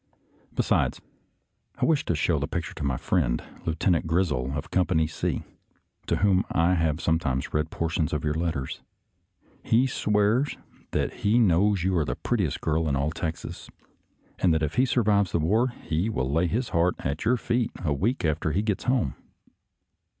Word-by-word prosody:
Besides, - - +1 0.8
I - - 0
wish 160 -3 +2
to 85 - 0
show - - +1
the - - -2
picture - - -4
to - - -6
my 65 -3 0
friend. - - 0 0.2
Lieutenant 85 +1 +1
Grizzle 80 -7 0
of 70 - -5
Com 90 -1 +2
pany 80 -4 +2
C, 80 - -2 0.6
to - - +2
whom 95 -2 +3
I 85 +2 +3
have 80 -3 +1
sometimes 80 -6 0
read 75 +1 0
portions 80 -1 -1
of 75 -3 -2
your 75 -1 0
letters. 80 -5 -3 0.8
He 120 +4 +3
swears 105 +2 +1 0.3
that - - -1
he 105 +3 +2
knows 100 -3 +3
you 95 0 +1
are - - +2
the - - -2
prettiest - - -1
girl 80 0 0
in 70 - +1
all 70 +3 0
Texas, 80 0 -5 0.7
and 90 - +3
that 80 - 0
if 75 - -1
he 130 +3 +3
survives 105 -6 +2
the - - +2
war 110 +11 +2
he 100 -6 -2
will 65 -11 -1
lay 85 +4 +2
his 115 +8 -1
heart 85 +2 +2
at 70 +2 -3
your 125 +3 +3
feet 120 0 0 0.2
a 75 - +2
week 105 - 0
after 80 0 0
he 100 +5 +1
gets 105 -3 -1
home. 125 - +1
85 Hz, 180 wpm, -26 LUFS, 75-105 Hz, 0.8 s, whom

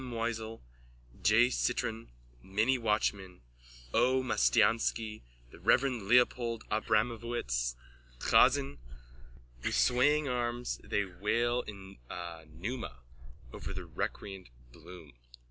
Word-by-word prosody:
Moisel, 115 - -4 0.6
J. 115 +4 +5
Citron, 115 -3 -1 0.3
Minnie 110 - +1
Watchman, 100 - -1 0.5
P. - - +3 0.2
Mastiansky, 110 - +2 0.3
The - - -14
Reverend 125 -7 +2
Leopold 120 -1 +3
Abramovitz, 110 - 0 0.4
Chazen. 70 +2 +3 0.8
With - - 0
swaying 145 +4 +3
arms 120 -1 -2
they 105 - 0
wail 115 +6 0
in 100 -4 -10 0.5
pneuma 95 - -6 0.5
over - - -6
the - - -6
recreant 95 -2 -5 0.2
Bloom.) 80 0 -13
110 Hz, 90 wpm, -32 LUFS, 95-120 Hz, 0.8 s, J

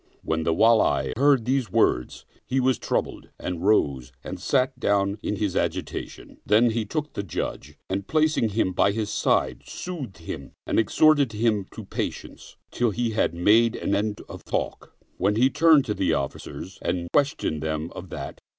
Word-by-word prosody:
When 80 0 -1
the 80 - +1
Wali 85 - +3
heard 135 -2 +3
these 130 -5 0
words, 60 -7 +1 0.2
he 135 - +1
was 130 -2 +2
troubled - - -2
and 90 -1 -5
rose 70 - +2
and - - -6
sat 130 -1 0
down 100 -2 +1
in - - -2
his 100 -2 -2
agitation; - - -4
then 115 +3 +4
he 110 -1 -1
took 150 +5 -4
the - - -3
Judge 100 -6 -5
and 95 +1 -3
placing 155 -7 +2
him 105 -2 0
by 100 +2 +3
his 105 -1 -2
side, - - +1
soothed 145 - -6
him 80 - -8
and - - +1
exhorted 140 +2 +4
him 105 -3 0
to - - -8
patience, - - -6 0.2
till 120 -1 +1
he 115 +2 -1
had 105 -6 0
made 110 +6 +4
an - - -2
end 105 +1 -1
of - - -10
talk, - - -4 0.2
when 100 +3 +1
he 130 +4 +3
turned 160 -4 +5
to 105 - -1
the 90 -5 +1
offi 70 -1 -3
cers 95 - -9
and 85 0 -2
questioned 140 - +1
them 80 +1 -3
of 90 0 -9
that. - - -7
105 Hz, 180 wpm, -25 LUFS, 90-125 Hz, 0.2 s, turned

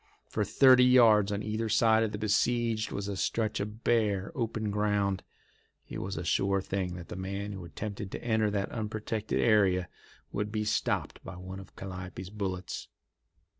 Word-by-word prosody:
For - - -1
thirty 130 -2 +6
yards 115 -5 +6
on 100 +1 -2
either 110 +1 -2
side 110 +1 +4
of 110 -2 0
the 105 - -4
besieged 110 +1 +1
was 100 0 -3
a 100 - -3
stretch 110 +3 -1
of 105 +3 -5
bare, 105 -5 +1
open 110 -3 -2
ground. 100 -2 +1 0.7
It - - -6
was 95 0 -4
a 80 - -3
sure 100 +2 +2
thing 95 -2 -3
that 85 -2 -9
the - - -6
man 100 +2 -4
who 95 -3 -7
attempted 100 +3 -6
to - - -6
enter 110 -2 +2
that 100 -1 -2
unprotected 110 -1 -2
area 95 -5 +3 0.4
would 105 +1 -2
be 105 -1 -1
stopped 105 - -1
by - - -8
one 95 +1 -8
of 95 - -13
Calliope's 95 -1 -7
bullets. 95 -3 -4
105 Hz, 170 wpm, -30 LUFS, 95-110 Hz, 0.7 s, thirty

